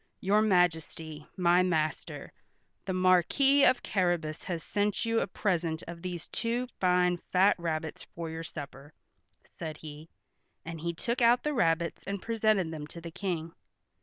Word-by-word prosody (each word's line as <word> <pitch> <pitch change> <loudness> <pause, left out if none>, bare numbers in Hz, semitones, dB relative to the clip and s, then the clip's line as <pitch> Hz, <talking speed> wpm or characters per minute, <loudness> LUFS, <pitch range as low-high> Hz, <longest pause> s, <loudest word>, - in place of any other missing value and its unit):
"Your 205 +3 +3
Majesty, 165 -5 0
my 175 0 +4
master, 160 -4 -1 0.5
the 190 - -2
Marquis 185 - +4
of 255 -2 +4
Carrabas, 175 -5 0
has 170 -4 -3
sent 205 +2 0
you 230 0 +2
a - - -1
present 170 -5 -1
of 170 0 -8
these 175 -2 -5
two 235 +2 -1
fine 180 -1 +3
fat 190 +2 +5
rabbits 160 -2 -3
for 170 -1 -4
your 160 0 -5
supper," 145 -2 -9 0.7
said 155 -2 -5
he, 155 +1 -10 0.6
and 165 -1 -6
he 170 +1 -1
took 235 +8 -2
out 240 +1 +5
the 300 - 0
rabbits 170 - +1
and 200 0 -2
presented 215 -5 +1
them 150 -2 -6
to 170 - -10
the 170 0 -8
King. 170 -3 -3
175 Hz, 155 wpm, -30 LUFS, 160-200 Hz, 0.7 s, fat